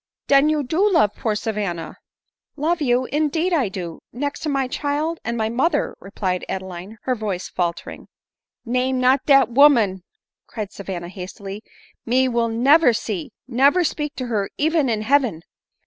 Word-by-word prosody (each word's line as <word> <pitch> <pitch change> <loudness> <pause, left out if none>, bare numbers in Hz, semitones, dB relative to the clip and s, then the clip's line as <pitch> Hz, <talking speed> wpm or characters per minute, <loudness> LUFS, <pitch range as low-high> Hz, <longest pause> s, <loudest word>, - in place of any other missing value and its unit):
" - - -67
Den 280 +2 +5
you 305 -1 +1
do 340 +10 +2
love 215 - +4
poor 220 -2 -1
Savanna 200 -6 -3 0.2
?" - - -59
" - - -65
Love 340 0 +1
you! 255 -2 +2
Indeed 315 +4 +1
I 270 - +2
do, 175 -4 -6
next 285 +4 -3
to 310 - -3
my 275 -2 0
child, 295 +5 -2
and 235 - -2
— - - -3
and - - -4
my 220 -1 0
mother," 280 +7 0
replied 190 -2 -3
Adeline, 190 +2 -6
her 255 - 0
voice 210 -6 -3
faltering. 170 -2 -4 0.3
" - - -61
Name 260 0 0
not 255 +2 +3
dat 275 -3 +6
woman," 235 -8 +5 0.5
cried 215 -3 -6
Savanna 185 -3 -6
hastily; 195 +2 -8 0.4
"me 255 +2 +2
will 235 -2 0
never 260 +4 +5
see, 210 -6 -3 0.2
never 275 +8 +3
speak 300 -2 -2
to 255 - -4
her 210 -5 -1
even 310 -2 +2
in 215 -2 -1
heaven." 245 - +1
245 Hz, 180 wpm, -22 LUFS, 200-285 Hz, 0.5 s, dat